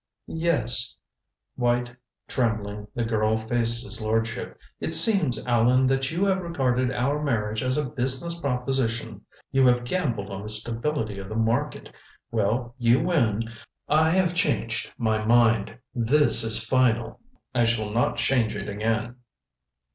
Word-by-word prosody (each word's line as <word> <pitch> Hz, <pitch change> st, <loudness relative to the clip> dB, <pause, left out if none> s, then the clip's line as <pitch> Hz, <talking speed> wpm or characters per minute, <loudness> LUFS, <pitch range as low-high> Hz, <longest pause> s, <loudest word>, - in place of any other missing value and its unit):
"Yes." 125 Hz, -7 st, 0 dB, 0.6 s
White, 120 Hz, 0 st, 0 dB, 0.3 s
trembling, 105 Hz, -4 st, -2 dB
the 120 Hz, -, -1 dB
girl 110 Hz, -1 st, +1 dB
faced 115 Hz, +1 st, 0 dB
his 110 Hz, +2 st, -8 dB
lordship. 115 Hz, +1 st, -2 dB, 0.2 s
"It -, -, 0 dB
seems, 190 Hz, -, +4 dB
Allan, 125 Hz, +2 st, +3 dB
that 135 Hz, 0 st, +1 dB
you 175 Hz, +5 st, 0 dB
have 190 Hz, -1 st, +1 dB
regarded 130 Hz, -7 st, 0 dB
our 135 Hz, +4 st, -1 dB
marriage 110 Hz, -6 st, -1 dB
as 130 Hz, +1 st, 0 dB
a 150 Hz, -, 0 dB
business 135 Hz, +6 st, -2 dB
proposition. 125 Hz, -6 st, -2 dB, 0.3 s
You 135 Hz, -1 st, +4 dB
have 125 Hz, 0 st, +3 dB
gambled 120 Hz, -, -2 dB
on 95 Hz, 0 st, -5 dB
the 105 Hz, -, -7 dB
stability 115 Hz, 0 st, -3 dB
of 95 Hz, 0 st, -8 dB
the 110 Hz, -, -5 dB
market. 115 Hz, +6 st, -1 dB, 0.4 s
Well, 115 Hz, +2 st, -1 dB
you 120 Hz, +1 st, +4 dB
win. 115 Hz, -, 0 dB, 0.4 s
I 155 Hz, +2 st, +3 dB
have 180 Hz, 0 st, +2 dB
changed 115 Hz, -10 st, -1 dB
my 110 Hz, -2 st, 0 dB
mind. 115 Hz, -1 st, +3 dB, 0.2 s
This 135 Hz, +4 st, +5 dB
is 115 Hz, 0 st, +1 dB
final. 120 Hz, -1 st, +1 dB, 0.3 s
I 120 Hz, -2 st, +2 dB
shall 110 Hz, -2 st, 0 dB
not 115 Hz, +3 st, 0 dB
change 120 Hz, -5 st, +1 dB
it 100 Hz, 0 st, -5 dB
again." 110 Hz, +3 st, -2 dB
120 Hz, 140 wpm, -25 LUFS, 110-135 Hz, 0.6 s, This